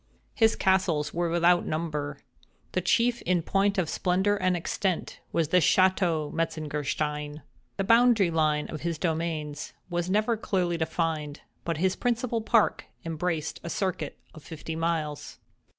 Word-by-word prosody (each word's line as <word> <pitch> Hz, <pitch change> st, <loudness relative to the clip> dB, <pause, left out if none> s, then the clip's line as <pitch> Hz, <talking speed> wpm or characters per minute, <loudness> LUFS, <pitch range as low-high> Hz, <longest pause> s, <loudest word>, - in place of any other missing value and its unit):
His 225 Hz, -2 st, +3 dB
castles 175 Hz, -6 st, +1 dB
were 175 Hz, 0 st, 0 dB
without 175 Hz, +1 st, +3 dB
number. 150 Hz, -3 st, -3 dB, 0.5 s
The 185 Hz, -, 0 dB
chief 235 Hz, +6 st, +2 dB
in 175 Hz, -1 st, +1 dB
point 200 Hz, +3 st, +1 dB
of 180 Hz, -4 st, +1 dB
splendor 190 Hz, +5 st, +1 dB
and 185 Hz, -3 st, +1 dB
extent 180 Hz, +1 st, -2 dB
was 160 Hz, -3 st, 0 dB
the 180 Hz, -, +4 dB
"Château 175 Hz, -3 st, +3 dB
Metzengerstein." 150 Hz, -1 st, -2 dB, 0.3 s
The 195 Hz, -, 0 dB
boundary 230 Hz, -4 st, +5 dB
line 155 Hz, -2 st, +1 dB
of 155 Hz, -, -6 dB
his 170 Hz, -1 st, -2 dB
dominions 160 Hz, -2 st, -3 dB, 0.2 s
was 175 Hz, +1 st, -1 dB
never 215 Hz, +4 st, +2 dB
clearly 180 Hz, -5 st, 0 dB
defined; 160 Hz, -2 st, -2 dB, 0.2 s
but 170 Hz, -2 st, -2 dB
his 185 Hz, +3 st, +1 dB
principal 240 Hz, -1 st, -1 dB
park 225 Hz, 0 st, +2 dB, 0.2 s
embraced 165 Hz, -1 st, -2 dB
a 170 Hz, -, -5 dB
circuit 175 Hz, -5 st, -2 dB, 0.2 s
of 155 Hz, -, -12 dB
fifty 160 Hz, +2 st, -7 dB
miles. 160 Hz, -3 st, -2 dB
170 Hz, 140 wpm, -27 LUFS, 155-190 Hz, 0.5 s, boundary